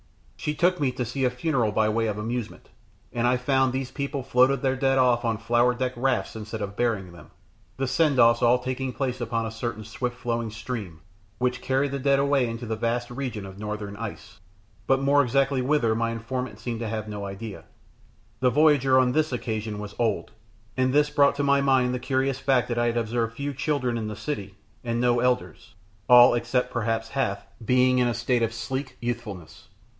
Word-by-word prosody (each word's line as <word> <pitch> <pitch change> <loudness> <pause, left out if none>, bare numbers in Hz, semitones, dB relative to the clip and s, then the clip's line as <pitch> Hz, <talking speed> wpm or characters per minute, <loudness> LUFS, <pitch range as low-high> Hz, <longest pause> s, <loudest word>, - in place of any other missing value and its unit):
She 150 - -3
took 180 +2 +2
me 140 -3 +1
to 125 -1 -3
see 130 +4 -3
a 125 - +4
funeral 125 -3 0
by 110 +1 +2
way 115 +1 +1
of 105 -1 -2
amusement, 115 +2 -5 0.4
and 120 0 +1
I 125 +1 +3
found 130 +1 +2
these 130 0 -3
people 140 -1 -3
floated 130 +2 +3
their 130 -1 +2
dead 135 0 +1
off 125 -2 +3
on 115 -2 0
flower 120 +2 +2
decked 130 +1 -2
rafts 130 -1 0
instead 110 0 -5
of 100 0 -6
burying 110 -7 -1
them, 85 -3 -14 0.5
the 135 - -1
send 135 +2 +2
offs 115 0 +5
all 120 +1 +5
taking 130 +1 -3
place 125 -2 -3
upon 115 -1 -1
a 110 - -4
certain 115 -1 -4
swift 120 +3 -4
flowing 115 -2 -2
stream, 105 -6 -6 0.4
which 125 0 -1
carried 135 +1 0
the 140 - -3
dead 140 +1 +3
away 140 -3 +2
into 115 +1 -5
the 110 0 -2
vast 120 +2 -2
region 120 -5 -4
of 95 0 -10
northern 105 -1 -5
ice, 110 -3 -8 0.5
but 135 0 +3
more 140 +1 +4
exactly 135 +1 +1
whither 125 -4 +2
my 115 +1 0
informant 115 0 -4
seemed 115 0 -4
to 115 -2 -3
have 110 -1 -4
no 105 -1 -5
idea. 100 +1 -8 0.7
The 125 - +3
voyager 140 -2 +4
on 130 -1 +4
this 155 +2 +1
occasion 110 -3 -3
was 105 0 -7
old, 115 -4 0 0.4
and 130 0 +2
this 145 +1 +3
brought 140 -1 +4
to 145 - -1
my 140 0 +3
mind 130 -2 +3
the 125 - -2
curious 130 +1 0
fact 130 -4 +2
that 120 -1 -1
I 120 - +2
had 120 0 0
observed 115 0 -1
few 140 0 -3
children 130 -4 -1
in 110 - -4
the 105 - -5
city, 100 -4 -5 0.3
and 115 -1 -1
no 120 0 +3
elders, 125 -2 -1 0.3
all, 125 0 +9
except 120 +1 -1
perhaps 115 -1 -1
Hath, 100 -8 -2 0.2
being 125 +2 +3
in 125 - +3
a 120 - -1
state 120 +1 0
of 115 -1 +1
sleek 130 +4 -4
youthfulness. 120 -8 -6
120 Hz, 205 wpm, -25 LUFS, 115-130 Hz, 0.7 s, all